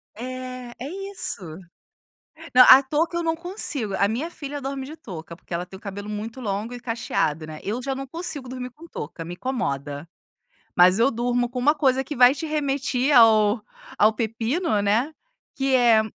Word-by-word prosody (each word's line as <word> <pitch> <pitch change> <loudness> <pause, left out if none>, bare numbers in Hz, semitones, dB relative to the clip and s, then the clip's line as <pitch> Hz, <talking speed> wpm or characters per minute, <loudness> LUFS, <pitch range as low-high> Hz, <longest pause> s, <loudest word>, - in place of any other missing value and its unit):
É, 255 +1 -6
é 265 +4 -5 0.2
isso. 370 - -4 1.1
Não, 255 0 +10
a 265 +1 +10
touca 310 +5 -1
eu 340 - 0
não 325 -1 0
consigo, 320 - -4
a 200 - +3
minha 265 +11 -2
filha 290 -2 -6
dorme 270 0 -4
de 310 +3 -9
touca, 170 - -9
porque 180 - -9
ela 175 +1 -2
tem 190 - -11
o 190 - -14
cabelo 205 0 -7
muito 215 +4 -5
longo 215 +1 -3
e 245 - -8
cacheado, 220 -10 -1
né, 155 -1 -9
eu 220 +5 -3
já 270 +1 -2
não 270 0 -6
consigo 305 -3 -6
dormir 250 0 -6
com 310 +7 -14
touca, 165 - -7
me 175 - -6
incomoda. 150 - -3 0.7
Mas 180 +2 +6
eu 235 +4 +4
durmo 245 +1 0
com 250 - -4
uma 290 +5 +4
coisa 265 -3 +2
que 295 +3 -6
vai 250 +1 +7
te 320 +2 -5
remeti 275 -3 0
ao 220 -3 +6 0.4
ao 215 - +5
pepino, 230 - -1
né, 225 +10 +1 0.4
que 270 -1 +1
é 235 -3 +5
245 Hz, 185 wpm, -24 LUFS, 210-275 Hz, 1.1 s, Não